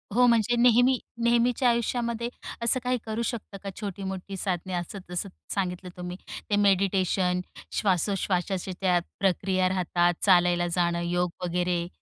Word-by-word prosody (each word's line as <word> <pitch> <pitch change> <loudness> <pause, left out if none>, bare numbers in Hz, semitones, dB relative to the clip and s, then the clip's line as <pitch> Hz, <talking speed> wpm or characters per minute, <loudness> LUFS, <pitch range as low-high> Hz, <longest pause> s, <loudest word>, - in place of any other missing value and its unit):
हो 250 +1 +6
म्हणजे 235 0 +3
नेहमी 245 +2 +5 0.3
नेहमीच्या 240 +1 +3
आयुष्यामध्ये, 235 0 -1 0.3
असं 235 +2 +4
काही 250 0 +1
करू 220 +1 -3
शकतं 220 -4 -5
का? 200 - -4
छोटी-मोठी 195 -1 -5
साधने, 185 -1 -2
असं-जसं 180 +1 -4 0.2
सांगितलं 180 -2 -2
तुम्ही 180 0 -6 0.3
ते 205 - +2
मेडिटेशन, 190 -2 +2 0.3
श्वासोश्वासाच्या 190 -1 0
त्या 180 -2 +3 0.2
प्रक्रिया 185 -1 +1
राहतात, 175 -1 +1
चालायला 175 -2 +4
जाणं, 170 -1 +1
योग 175 +1 0 0.2
वगैरे? 175 0 0
190 Hz, 125 wpm, -27 LUFS, 180-225 Hz, 0.3 s, हो